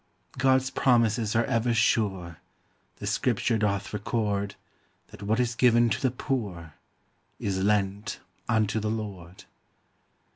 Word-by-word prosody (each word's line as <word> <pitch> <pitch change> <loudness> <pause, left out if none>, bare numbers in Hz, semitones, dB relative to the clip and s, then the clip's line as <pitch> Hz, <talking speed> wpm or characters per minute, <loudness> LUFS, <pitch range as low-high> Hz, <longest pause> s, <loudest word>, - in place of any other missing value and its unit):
God's 130 0 +3
promises 115 -4 +2
are 115 - +3
ever 115 +1 +1
sure, 110 -4 +2
• 85 - -11 0.6
The - - -8
scripture. 115 - +1
<doth 100 -1 -1
record 100 -1 -1 0.5
That - - -13
what 110 +3 0
is 125 -1 +1
given 120 -1 +4
to 100 - -1
the 130 - +3
poor! 105 - -4 0.7
Is 95 -2 -1
lent 100 0 0 0.3
unto 110 -1 +2
the 105 0 -2
Lord. 100 -5 -6
110 Hz, 125 wpm, -27 LUFS, 100-120 Hz, 0.7 s, given